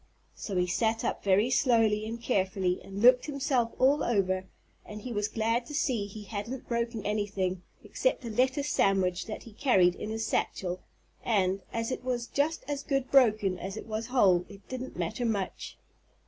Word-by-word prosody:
So 200 Hz, -, -6 dB
he 180 Hz, 0 st, +2 dB
sat 225 Hz, +5 st, 0 dB
up -, -, -2 dB
very 200 Hz, +5 st, +3 dB
slowly 225 Hz, -5 st, +3 dB
and 230 Hz, +1 st, -5 dB
carefully 190 Hz, -5 st, 0 dB
and 195 Hz, +2 st, -6 dB
looked 250 Hz, +2 st, +6 dB
himself 270 Hz, -5 st, 0 dB
all 280 Hz, +3 st, +4 dB
over 190 Hz, -4 st, 0 dB, 0.4 s
and 210 Hz, 0 st, -9 dB
he 250 Hz, -, -5 dB
was 205 Hz, -1 st, 0 dB
glad 230 Hz, +2 st, 0 dB
to 295 Hz, -, -6 dB
see 240 Hz, -9 st, 0 dB
that 200 Hz, -, -13 dB
he 215 Hz, -, -8 dB
hadn't 220 Hz, +5 st, -6 dB
broken 235 Hz, -2 st, -2 dB
anything 200 Hz, -3 st, -1 dB, 0.2 s
except -, -, -1 dB
a 230 Hz, -, -4 dB
lettuce 260 Hz, +5 st, +1 dB
sandwich 190 Hz, -2 st, +1 dB
that 215 Hz, -, -6 dB
he 230 Hz, -, -13 dB
carried 195 Hz, -8 st, +4 dB
in 210 Hz, -, -6 dB
his 220 Hz, 0 st, -2 dB
satchel 180 Hz, -1 st, -2 dB, 0.4 s
and, 195 Hz, -4 st, +1 dB
as 230 Hz, +2 st, -2 dB
it 255 Hz, -, -4 dB
was 245 Hz, -2 st, -1 dB
just 295 Hz, +6 st, -1 dB
as 285 Hz, -1 st, -2 dB
good 275 Hz, -2 st, -1 dB
broken 215 Hz, -8 st, +4 dB
as 190 Hz, +3 st, -5 dB
it -, -, -7 dB
was 220 Hz, 0 st, -4 dB
whole, 190 Hz, -9 st, +4 dB
it 200 Hz, -1 st, -14 dB
didn't 255 Hz, 0 st, -6 dB
matter 175 Hz, +8 st, -2 dB
much. 210 Hz, -5 st, -3 dB
220 Hz, 185 wpm, -29 LUFS, 195-250 Hz, 0.4 s, looked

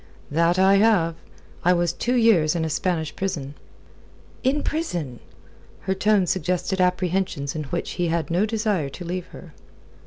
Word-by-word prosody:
"That 170 Hz, +3 st, +2 dB
I 190 Hz, +1 st, +5 dB
have. 195 Hz, -6 st, +3 dB, 0.5 s
I 180 Hz, -, +5 dB
was 175 Hz, -1 st, +1 dB
two 245 Hz, +7 st, -1 dB
years 195 Hz, -10 st, +4 dB
in 165 Hz, -1 st, 0 dB
a 160 Hz, -, -3 dB
Spanish 160 Hz, -1 st, -1 dB
prison." 160 Hz, -8 st, -3 dB, 0.9 s
"In 275 Hz, +3 st, +1 dB
prison?" 175 Hz, -, -3 dB, 0.6 s
Her 190 Hz, -, -1 dB
tone 200 Hz, 0 st, +2 dB
suggested 185 Hz, +2 st, -1 dB
apprehensions 180 Hz, -5 st, 0 dB
in 155 Hz, -1 st, -3 dB
which 170 Hz, +5 st, -3 dB
he 175 Hz, -1 st, -1 dB
had 165 Hz, 0 st, -1 dB
no 185 Hz, +6 st, +2 dB
desire 210 Hz, -9 st, -1 dB
to 175 Hz, +6 st, -9 dB
leave 180 Hz, +1 st, -4 dB
her. 165 Hz, -4 st, -13 dB
180 Hz, 155 wpm, -23 LUFS, 165-195 Hz, 0.9 s, I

